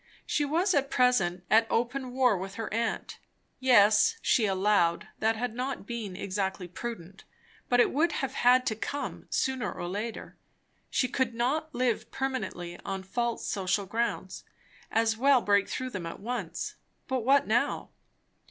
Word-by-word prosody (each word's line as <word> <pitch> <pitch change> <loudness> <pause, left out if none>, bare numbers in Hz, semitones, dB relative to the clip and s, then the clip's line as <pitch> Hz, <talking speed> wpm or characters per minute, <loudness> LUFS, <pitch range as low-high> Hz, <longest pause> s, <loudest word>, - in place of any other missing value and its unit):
She 295 - 0
was 345 +7 +1
at 275 -2 +1
present 190 -10 +2
at 225 +1 +5
open 250 +2 -1
war 250 -3 +3
with 190 +1 -6
her 225 -2 -5
aunt. 230 0 -2 0.4
Yes, 240 - +5
she 220 -4 +3
allowed, 190 -3 +2
that 220 +1 +2
had 240 +1 -3
not 255 -1 -4
been 215 -4 -5
exactly 190 -1 -3
prudent; 195 -1 -7 0.5
but 245 - +4
it - - +5
would 320 +4 +2
have 270 -3 -2
had 250 +1 +4
to 220 - 0
come, 285 +6 -5
sooner 260 -2 -1
or 175 - -5
later. 210 +5 -5 0.5
She 255 - +1
could 250 -2 -1
not 295 +6 -1
live 240 -2 0
permanently 195 -10 -4
on 195 -1 -4
false 235 +4 -2
social 195 0 0
grounds; 205 -3 -2 0.5
as 225 0 +1
well 270 +2 +5
break 200 -3 +2
through 255 0 -3
them 185 -6 -5
at 165 - -7
once. 240 - -4 0.3
But 260 -1 0
what 270 +4 +4
now? 240 +6 0
230 Hz, 155 wpm, -29 LUFS, 200-255 Hz, 0.5 s, at